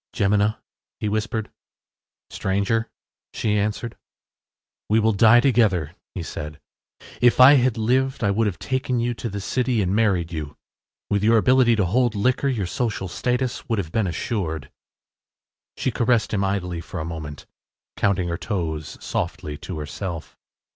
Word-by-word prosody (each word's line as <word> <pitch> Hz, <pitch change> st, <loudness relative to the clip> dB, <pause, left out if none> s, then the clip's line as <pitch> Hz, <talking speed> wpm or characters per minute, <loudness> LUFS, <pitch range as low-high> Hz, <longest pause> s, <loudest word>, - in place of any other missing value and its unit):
“Jemina,” 105 Hz, +2 st, +2 dB, 0.4 s
he 105 Hz, -, -2 dB
whispered. 110 Hz, +1 st, -2 dB, 0.8 s
“Stranger,” 100 Hz, +4 st, 0 dB, 0.5 s
she 105 Hz, -2 st, 0 dB
answered. 105 Hz, +3 st, -1 dB, 0.9 s
“We 110 Hz, +2 st, +4 dB
will 110 Hz, 0 st, +3 dB
die 110 Hz, +4 st, +6 dB
together,” 105 Hz, -, +2 dB, 0.2 s
he 90 Hz, -, -3 dB
said. 75 Hz, -1 st, -7 dB, 0.6 s
“If 120 Hz, -1 st, +5 dB
we 135 Hz, +3 st, +9 dB
had 125 Hz, -2 st, +2 dB
lived 130 Hz, +3 st, +1 dB
I 100 Hz, -, +3 dB
would 110 Hz, +2 st, +1 dB
have 95 Hz, -5 st, -3 dB
taken 130 Hz, +1 st, -1 dB
you 120 Hz, +1 st, 0 dB
to 115 Hz, 0 st, -5 dB
the 100 Hz, 0 st, -4 dB
city 125 Hz, +3 st, 0 dB
and 95 Hz, -1 st, +1 dB
married 95 Hz, -7 st, +1 dB
you. 75 Hz, -3 st, -5 dB, 0.5 s
With 100 Hz, 0 st, +1 dB
your 115 Hz, +1 st, +5 dB
ability 125 Hz, +1 st, +4 dB
to 100 Hz, -3 st, +1 dB
hold 120 Hz, +4 st, +1 dB
liquor, 130 Hz, +7 st, +1 dB
your 115 Hz, -8 st, 0 dB
social 110 Hz, 0 st, -2 dB
success 125 Hz, +7 st, -2 dB
would 115 Hz, -, +1 dB
have 85 Hz, -6 st, -3 dB
been 110 Hz, -1 st, +1 dB
assured.” 85 Hz, -, -3 dB, 1.1 s
She 130 Hz, -, 0 dB
caressed 120 Hz, -2 st, +1 dB
him 100 Hz, -1 st, +1 dB
idly 90 Hz, -3 st, -2 dB
for -, -, -7 dB
a 80 Hz, -, -3 dB
moment, 80 Hz, -3 st, -7 dB, 0.5 s
counting 95 Hz, -3 st, +1 dB
her 85 Hz, -1 st, -3 dB
toes 80 Hz, -7 st, -3 dB
softly 75 Hz, -, -3 dB
to 90 Hz, +2 st, -6 dB
herself. 80 Hz, +3 st, -6 dB
105 Hz, 155 wpm, -23 LUFS, 90-120 Hz, 1.1 s, we